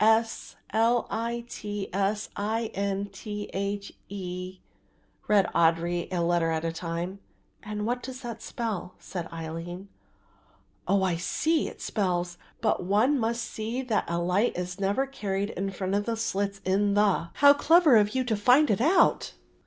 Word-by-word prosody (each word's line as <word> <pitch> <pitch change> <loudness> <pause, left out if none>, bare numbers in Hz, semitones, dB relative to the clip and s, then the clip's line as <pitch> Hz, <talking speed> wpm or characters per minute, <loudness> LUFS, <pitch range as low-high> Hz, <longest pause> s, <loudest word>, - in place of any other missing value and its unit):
s. 225 +1 +2 0.2
l. 230 +2 +3
i. 235 +1 -2
t. 205 -3 -5
s. 200 +2 0
i. 220 +2 -1
n. 200 0 -1
t. 205 +1 -6
h. 200 +1 -3 0.2
e.," 185 -1 -6 0.7
read 205 -3 +5
Audry, 170 +1 +2
a 180 - -1
letter 170 -1 +2
at 160 0 -1
a 165 - 0
time. 170 +3 -4 0.4
"And 210 -1 -4
what 245 +2 -1
does 260 0 -7
that 235 -3 -6
spell?" 215 -6 -4
said 175 -3 -6
Aline. 165 +4 -6 1.0
"Oh, 195 -1 +3
I 180 -3 +1
see, 310 - +1
It - - -10
spells, 175 -4 -1 0.2
'but - - +1
one 220 +10 +3
must 235 +1 0
see 230 +4 -4
that 225 -5 0
a 170 - -1
light 180 +7 +1
is 180 +1 -4
never 200 +7 +1
carried 205 -6 -3
in 195 +2 -3
front 190 0 -3
of 205 +1 +1
the 230 -1 -1
slits 200 -3 -2
in 200 +2 +2
the.' 205 -5 +3
How 285 0 +8
clever 320 -1 +5
of 210 +1 +4
you 260 - +2
to 235 -3 0
find 250 +8 +5
it 210 - +1
out!" 325 +9 +3
200 Hz, 165 wpm, -27 LUFS, 180-230 Hz, 1.0 s, How